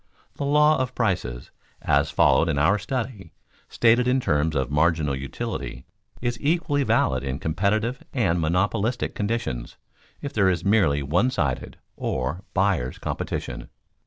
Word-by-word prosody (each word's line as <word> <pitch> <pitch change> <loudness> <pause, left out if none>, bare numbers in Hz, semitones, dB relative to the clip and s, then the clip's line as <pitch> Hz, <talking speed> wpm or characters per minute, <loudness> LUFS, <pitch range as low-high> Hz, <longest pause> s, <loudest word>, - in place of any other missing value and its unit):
The 140 - -4
law 150 +2 +4
of 130 -1 -2
prices, 85 - -2 0.3
as 70 0 +2
followed 85 - +3
in 75 - 0
our 90 +9 +3
study, 115 -5 -4 0.4
stated 120 +1 +3
in 130 +1 +3
terms 80 - 0
of 65 0 -1
marginal 75 -1 +2
utility, 65 0 -5 0.4
is 120 -1 -1
equally 145 -1 +1
valid 65 - +1
in 65 0 -3
competitive 105 - 0
and 95 -10 +1
in - - -1
monopolistic 100 +8 0
conditions 100 - -3 0.4
if 145 0 -6
there 100 -3 +3
is 90 -1 -1
merely 95 -9 +3
one 90 - +2
sided, 75 - -2 0.2
or 70 +9 -2
buyers', 95 -10 +1
competition. - - -4
95 Hz, 140 wpm, -24 LUFS, 75-120 Hz, 0.4 s, law